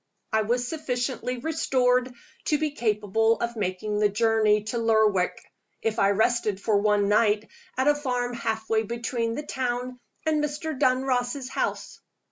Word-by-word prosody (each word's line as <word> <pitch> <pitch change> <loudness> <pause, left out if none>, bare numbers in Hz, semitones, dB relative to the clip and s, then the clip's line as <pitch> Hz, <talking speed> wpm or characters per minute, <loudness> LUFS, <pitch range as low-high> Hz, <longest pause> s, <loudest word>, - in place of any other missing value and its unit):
I 220 - +4
was 245 +3 0
sufficiently 250 -3 -3
restored 255 -3 +1 0.3
to 300 - +2
be 305 0 -1
capable 220 -2 +1
of 235 0 -2
making 210 +1 -2
the 210 -1 +4
journey 215 0 +2
to 225 +2 -3
Lerwick, 220 -5 +2 0.4
if 225 0 0
I 195 - +4
rested 215 -1 +1
for 210 0 +1
one 205 0 +2
night 210 0 +2 0.3
at 260 +2 +1
a 295 - +6
farm 250 -4 -2
half 220 -2 -3
way 220 -1 +2
between 230 +1 -2
the 295 - -4
town 250 -2 -3 0.3
and 305 -1 +1
Mr. 300 +1 -3
Dunross's 255 0 0
house. - - -3
235 Hz, 150 wpm, -26 LUFS, 215-255 Hz, 0.4 s, a